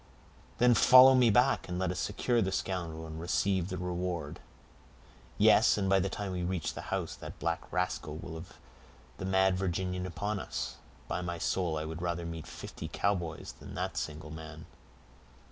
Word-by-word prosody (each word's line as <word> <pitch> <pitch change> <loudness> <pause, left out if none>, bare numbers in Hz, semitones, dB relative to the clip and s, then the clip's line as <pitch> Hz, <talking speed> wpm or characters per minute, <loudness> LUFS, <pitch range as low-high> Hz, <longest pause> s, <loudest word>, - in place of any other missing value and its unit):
"Then 120 0 +5
follow 130 +2 +9
me 125 -2 +5
back, 125 0 +3
and 90 - -3
let 95 -1 0
us 90 - -4
secure 115 +4 0
the 95 -2 0
scoundrel, 85 -4 -3
and 80 0 -7
receive 95 +1 +1
the 90 - -3
reward." 90 -4 -3 1.0
"Yes; - - +5
and 100 -2 0
by 95 0 +4
the 95 +1 0
time 100 0 -4
we 90 -1 -3
reach 90 -2 -2
the - - -6
house, - - -2
that - - -9
black 85 +1 -3
rascal 90 -4 -2
will 80 - -7
have 80 +2 -9 0.6
the - - -4
mad 95 0 +3
Virginian 90 0 -2
upon 100 +3 -3
us. 65 -7 -4 0.3
By - - -2
my 85 -1 -3
soul 85 -1 0
I 75 - -3
would 80 +1 -6
rather 85 -1 -2
meet 80 -2 -6
fifty - - -8
Cowboys 90 -5 -2
than - - -10
that - - -3
single 75 0 -4
man." 80 0 -9
90 Hz, 180 wpm, -31 LUFS, 80-95 Hz, 1.0 s, follow